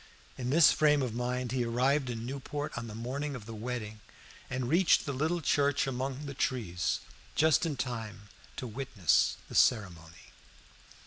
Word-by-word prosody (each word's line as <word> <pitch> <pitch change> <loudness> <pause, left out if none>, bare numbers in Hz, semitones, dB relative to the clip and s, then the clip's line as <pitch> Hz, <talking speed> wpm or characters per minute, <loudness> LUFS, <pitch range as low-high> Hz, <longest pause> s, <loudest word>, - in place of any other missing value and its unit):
In 125 -1 -4
this 155 +3 +7
frame 150 -2 +3
of 120 -4 -3
mind 125 +1 -2
he 130 -1 0
arrived 130 +4 +1
in 115 -1 -4
Newport 140 +3 -5
on 120 -1 -5
the 105 - -8
morning 135 +5 -3
of 115 -5 -8
the 115 - -8
wedding, 110 -1 -5 0.5
and 130 -1 -2
reached 170 +5 +4
the 140 - -2
little 160 +6 0
church 145 -2 +2
among 135 +2 -3
the 140 - -5
trees 105 -11 -1 0.3
just 160 +2 +4
in 150 -4 -3
time 115 -4 -4 0.3
to - - -5
witness 115 - +1
the - - -11
ceremony. 85 -7 +1
125 Hz, 165 wpm, -31 LUFS, 115-140 Hz, 0.5 s, this